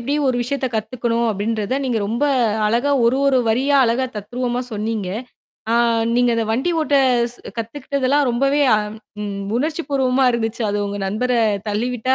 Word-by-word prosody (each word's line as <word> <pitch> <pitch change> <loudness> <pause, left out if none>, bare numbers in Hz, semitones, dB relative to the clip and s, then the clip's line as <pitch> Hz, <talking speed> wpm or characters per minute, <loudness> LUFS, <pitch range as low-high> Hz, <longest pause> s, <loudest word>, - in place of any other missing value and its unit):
எப்படி 275 +5 -2
ஒரு 255 - +1
விஷயத்தைக் 260 -1 -3
கத்துக்கணும்." 230 +1 -1
அப்படீன்றதை 215 +3 -2
நீங்க 240 -4 0
ரொம்ப 235 +6 -2 0.4
அழகா 240 +6 +1
ஒரு, 240 +3 +3
ஒரு 265 -2 +4
வரியா 265 +6 +2
அழகா 240 +3 +1
தத்ரூவமா 245 +4 -3
சொன்னீங்க. 215 -2 -2 0.6
அ - - +3 0.4
நீங்க 245 0 +3
அத 230 - +1
வண்டி 265 +9 0
ஓட்ட 290 -2 0 0.4
ஸ் - - -8 0.2
கத்துக்கிட்டதெல்லாம் 275 +3 0
ரொம்பவே 275 +4 +2
அம் 210 +1 -3 0.3
ம் 200 -1 -4
உணர்ச்சிபூர்வமா 275 -3 0
இருந்துச்சு. 230 0 -2
அது 205 0 -1
உங்க 200 0 -4
நண்பரத் 220 -1 0
தள்ளிவிட்டதா 245 +4 0
240 Hz, 150 wpm, -20 LUFS, 220-260 Hz, 0.6 s, ஒரு